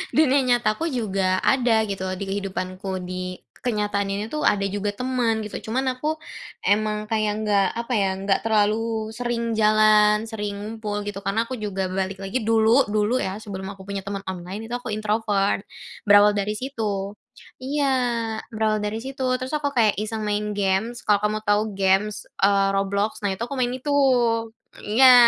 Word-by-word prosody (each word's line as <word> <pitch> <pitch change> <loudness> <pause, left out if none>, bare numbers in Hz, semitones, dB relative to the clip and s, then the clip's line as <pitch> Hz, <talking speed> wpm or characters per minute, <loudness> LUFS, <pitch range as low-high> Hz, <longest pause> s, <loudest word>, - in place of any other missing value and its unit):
dunia 285 -3 +4
nyata 240 -4 +2
aku, 325 +6 -2
juga 195 -6 0
ada 235 -4 +3
gitu 195 -2 -4 0.2
di 200 - -4
kehidupanku, 190 -1 -3
di 185 0 -5 0.2
kenyataan 205 -4 -1
ini 200 +2 -2
tuh 305 +5 -4
ada 200 -1 +3
juga 205 +1 -2
teman 240 -1 0
gitu, 210 - -7
cuman 260 +4 0
aku 305 +4 -2 0.5
emang 210 +1 +1
kayak 215 -1 +1
enggak 200 -2 +3
apa 235 +2 -3
ya, 195 -2 +2
enggak 195 0 +1
terlalu 220 0 +1
sering 235 -1 -2
jalan, 215 0 +5
sering 210 -2 -4
ngumpul 210 -1 -4
gitu. 200 -1 -5
Karena 215 +4 0
aku 255 - -4
juga 195 -2 -2
balik 190 +1 -3
lagi 195 +6 -2
dulu 225 +3 +4
dulu 215 +4 +1
ya 190 +1 -3
sebelum 195 -3 -6
aku 195 -1 -12
punya 200 -1 -3
teman 195 0 -5
online 190 +4 -5
itu 240 - -7
aku 245 0 -5
introvert. 210 -2 0 0.4
Berawal 205 0 +6
dari 210 +1 -1
situ 210 -6 -3 0.5
iya, 285 +2 0 0.7
berawal 215 -1 +1
dari 210 +1 -2
situ, 265 +1 -5 0.2
terus 255 +3 -5
aku 290 -1 0
kayak 220 -3 +4
iseng 220 +1 -3
main 210 0 -1
games. 200 +5 0
Kalau 205 -1 +3
kamu 215 0 +1
tahu 205 0 +3 0.2
games, 195 +2 +1 0.2
eee, 195 0 +4
Roblox. 200 +2 -1
Nah, 195 - +1
itu 190 - -9
aku 280 - -6
main 245 -1 +1
itu 285 +3 -2 0.9
iya 255 +5 +7
210 Hz, 170 wpm, -23 LUFS, 200-230 Hz, 0.9 s, iya